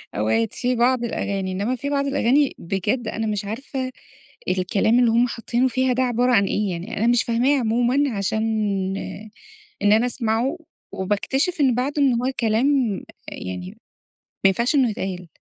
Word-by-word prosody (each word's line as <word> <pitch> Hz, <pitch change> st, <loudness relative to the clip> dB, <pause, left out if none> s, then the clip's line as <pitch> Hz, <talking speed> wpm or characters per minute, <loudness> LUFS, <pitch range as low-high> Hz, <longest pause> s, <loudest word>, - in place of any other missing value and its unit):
أوقات 110 Hz, +2 st, 0 dB
في 250 Hz, 0 st, -1 dB
بعض 245 Hz, +1 st, +2 dB
الأغاني، 195 Hz, -4 st, -2 dB
إنّما 205 Hz, +7 st, -1 dB
في 280 Hz, +4 st, -4 dB
بعض 280 Hz, -1 st, 0 dB
الأغاني 275 Hz, +1 st, +2 dB
بجد 205 Hz, +7 st, -2 dB
أنا 220 Hz, 0 st, -2 dB
مش 210 Hz, -1 st, -2 dB
عارفة 255 Hz, +4 st, -4 dB, 0.6 s
الكلام 195 Hz, +6 st, +2 dB
اللي 235 Hz, -2 st, +4 dB
هم 240 Hz, +2 st, +3 dB
حاطّينه 240 Hz, +2 st, 0 dB
فيها 255 Hz, +1 st, +1 dB
ده 260 Hz, +1 st, +1 dB
عبارة 245 Hz, 0 st, +1 dB
عن 200 Hz, -4 st, +4 dB
إيه، 205 Hz, -1 st, -1 dB
يعني 180 Hz, +7 st, -5 dB
أنا 225 Hz, +3 st, +1 dB
مش 240 Hz, 0 st, +4 dB
فاهماه 250 Hz, +4 st, +2 dB
عمومًا، 245 Hz, +4 st, +1 dB
عشان 210 Hz, +2 st, -1 dB, 1.4 s
إن 205 Hz, 0 st, +4 dB
أنا 225 Hz, +3 st, +4 dB
أسمعه 245 Hz, +5 st, -1 dB, 0.3 s
وباكتشف 265 Hz, -, -1 dB
إن 255 Hz, -4 st, +3 dB
بعدُه 285 Hz, +4 st, -1 dB
إن 265 Hz, -3 st, +4 dB
هو 260 Hz, +1 st, 0 dB
كلام 225 Hz, +2 st, +2 dB, 0.6 s
يعني 90 Hz, 0 st, -6 dB, 0.8 s
ما -, -, +8 dB
ينفعش 235 Hz, +9 st, +1 dB
إنّه 260 Hz, -5 st, +3 dB
يتقال. 185 Hz, -4 st, -5 dB
235 Hz, 160 wpm, -22 LUFS, 205-255 Hz, 1.4 s, ما